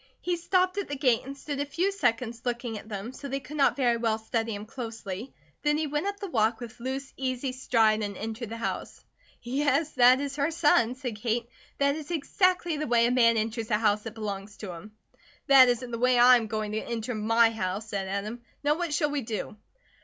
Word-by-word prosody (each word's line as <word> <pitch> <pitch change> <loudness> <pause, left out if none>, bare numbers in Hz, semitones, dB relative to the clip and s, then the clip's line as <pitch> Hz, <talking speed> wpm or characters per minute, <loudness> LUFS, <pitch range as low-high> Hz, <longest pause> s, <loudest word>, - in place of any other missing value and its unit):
He 355 0 -1
stopped 370 +2 +1
at 400 - -3
the 285 - -4
gate 255 -4 +2
and 275 +1 -7
stood 285 0 -5
a 285 - 0
few 350 +7 0
seconds 240 - -1
looking 240 -2 -3
at 215 +1 -9
them, 210 +4 -5
so 280 - -8
they 275 0 -2
could 300 +2 -9
not 280 - +4
very 245 -4 +2
well 225 -2 0
study 225 0 -2
him 205 +1 -7
closely, 225 -2 -6 0.3
then 295 0 +2
he 315 - 0
went 295 +5 -2
up 405 0 -3
the 400 - -4
walk 225 - +1
with 240 0 -9
loose, 265 +2 -4
easy 260 0 -2
stride 225 -4 +2
and 200 -2 -4
entered 225 +1 -5
the 230 - -5
house. 230 - -5 0.4
"Yes, 285 +4 +1
that 250 0 +6
is 280 0 -4
her 285 +2 +1
son," 290 -7 +3
said 250 -5 -5
Kate. 230 +2 -1 0.3
"That 280 0 +2
is 310 0 -7
exactly 350 0 +1
the 305 - -2
way 235 -1 +4
a 240 - +2
man 230 -2 +4
enters 225 +1 -2
a 210 - +3
house 210 -1 +2
that 225 0 -8
belongs 205 -2 -5
to 200 -4 -6
him." 200 +6 -11 0.5
"That 270 -3 +8
isn't 245 0 -1
the 230 - -3
way 250 0 +3
I 250 +1 +8
am 225 -2 -3
going 215 -1 -3
to 215 - -1
enter 235 +1 -4
my 225 +1 +3
house," 210 0 -3
said 195 -3 -3
Adam. 205 +5 -4 0.2
"Now 295 +3 +2
what 340 -4 -1
shall 295 -2 +1
we 290 -1 -1
do?" 220 -3 -5
240 Hz, 225 wpm, -28 LUFS, 220-280 Hz, 0.5 s, That